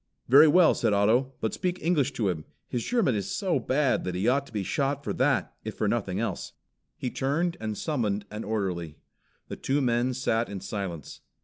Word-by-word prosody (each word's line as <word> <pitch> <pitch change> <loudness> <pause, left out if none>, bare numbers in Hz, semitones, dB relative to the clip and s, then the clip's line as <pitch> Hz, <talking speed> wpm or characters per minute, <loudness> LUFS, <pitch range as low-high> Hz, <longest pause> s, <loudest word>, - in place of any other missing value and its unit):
"Very 140 +5 +8
well," 170 +2 +6
said 110 -3 +1
Otto, 115 +7 +2
"but 110 - -1
speak 180 -1 -2
English 150 -6 +1
to 115 -6 -1
him. 80 -4 -3 0.2
His 120 -2 -2
German 230 - +1
is 100 -3 -2
so 185 -8 0
bad 130 +3 +1
that 90 -1 -3
he 95 +5 0
ought 140 +3 +2
to - - -16
be 105 -3 -2
shot 140 +6 -1
for - - -2
that - - +1
if - - -5
for - - 0
nothing - - -1
else." - - -3 0.4
He 125 - -3
turned 165 +6 0
and 110 -2 -4
summoned 105 -10 -1
an 105 +1 -5
orderly. 90 -7 -3 0.5
The - - -6
two 140 +2 0
men 125 -1 +1
sat 120 -3 0
in 100 -1 -5
silence. 95 -6 -6
120 Hz, 200 wpm, -27 LUFS, 105-140 Hz, 0.5 s, Very